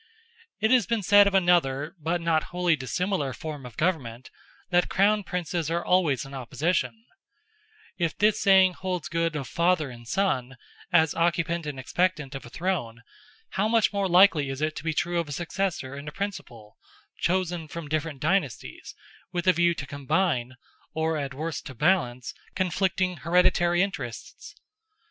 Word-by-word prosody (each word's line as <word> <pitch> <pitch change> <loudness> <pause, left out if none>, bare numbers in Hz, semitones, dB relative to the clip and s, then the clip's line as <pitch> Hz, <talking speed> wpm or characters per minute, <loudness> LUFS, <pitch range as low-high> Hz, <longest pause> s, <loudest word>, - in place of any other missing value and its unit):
It 220 +1 +2
has 245 -6 +4
been 230 -2 0
said 205 +2 +6
of 200 - 0
another 165 -5 +2
but 165 +3 -1
not 165 -2 +1
wholly 175 -2 +1
dissimilar 145 +2 -2
form 150 -4 -7
of 115 - -14
government, 130 -9 -2 0.4
that 175 0 +3
Crown 205 +2 +3
Princes 175 -3 -3
are 170 +1 -1
always 165 -9 +2
in 135 - -11
opposition; 165 - -2 0.9
if 170 -3 -1
this 210 0 +2
saying 190 -2 +5
holds 180 -2 -4
good 165 -1 -1
of 140 -4 -4
father 170 -5 +1
and 120 -1 -12
son, 135 -8 -1 0.3
as 160 -3 +4
occupant 170 -1 0
and 140 -3 -5
expectant 150 0 -1
of 135 -3 -7
a - - -12
throne, 125 -8 -3 0.5
how 195 +3 0
much 225 -1 +2
more 200 -1 0
likely 175 -6 +5
is 135 0 -4
it 155 +1 -1
to - - -6
be 160 -1 -2
true 175 +1 0
of 165 -3 -3
a - - -6
successor 170 -3 -3
and 140 +1 -8
a - - -4
principal, 120 - -7 0.4
chosen 175 -2 -1
from 165 +1 -7
different 155 -1 -2
dynasties, 155 - -2 0.4
with 175 -1 -2
a 185 - +6
view 175 0 +2
to 140 - -5
combine, 135 -2 -1 0.4
or 160 0 0
at 140 -3 -4
worst 155 +2 -4
to 130 - -9
balance, 125 -6 +1 0.2
conflicting 185 0 0
hereditary 175 0 +3
interests? 195 0 -6
170 Hz, 165 wpm, -26 LUFS, 140-185 Hz, 0.9 s, said